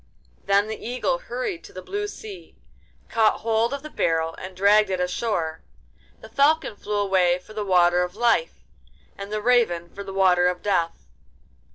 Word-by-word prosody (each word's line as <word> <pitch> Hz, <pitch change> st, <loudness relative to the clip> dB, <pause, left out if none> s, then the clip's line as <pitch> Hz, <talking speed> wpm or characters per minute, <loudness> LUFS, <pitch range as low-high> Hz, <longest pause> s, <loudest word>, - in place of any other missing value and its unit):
Then 200 Hz, +1 st, +3 dB
the 220 Hz, -, -7 dB
Eagle 255 Hz, -, -1 dB
hurried -, -, -5 dB
to -, -, -13 dB
the 185 Hz, -, -8 dB
blue 415 Hz, +1 st, -3 dB
sea, 410 Hz, -3 st, -10 dB, 0.5 s
caught 225 Hz, -1 st, +2 dB
hold 225 Hz, +1 st, +1 dB
of 280 Hz, 0 st, -5 dB
the 305 Hz, -, -7 dB
barrel, 165 Hz, 0 st, 0 dB
and 185 Hz, 0 st, -9 dB
dragged 205 Hz, +1 st, +4 dB
it 185 Hz, -1 st, -1 dB
ashore; 180 Hz, -3 st, -2 dB, 0.6 s
the -, -, -11 dB
Falcon 295 Hz, -4 st, +2 dB
flew 210 Hz, +1 st, -5 dB
away 190 Hz, -3 st, +2 dB
for 180 Hz, +4 st, -15 dB
the 215 Hz, -1 st, -3 dB
Water 180 Hz, -2 st, +3 dB
of 180 Hz, +1 st, -3 dB
Life, 240 Hz, -, +1 dB, 0.5 s
and 200 Hz, +1 st, -8 dB
the 215 Hz, 0 st, -3 dB
Raven 215 Hz, -9 st, +2 dB
for 200 Hz, -, -7 dB
the 195 Hz, -, -8 dB
Water 185 Hz, -2 st, +3 dB
of 180 Hz, 0 st, -2 dB
Death. 170 Hz, -5 st, -1 dB
205 Hz, 175 wpm, -24 LUFS, 180-240 Hz, 0.6 s, dragged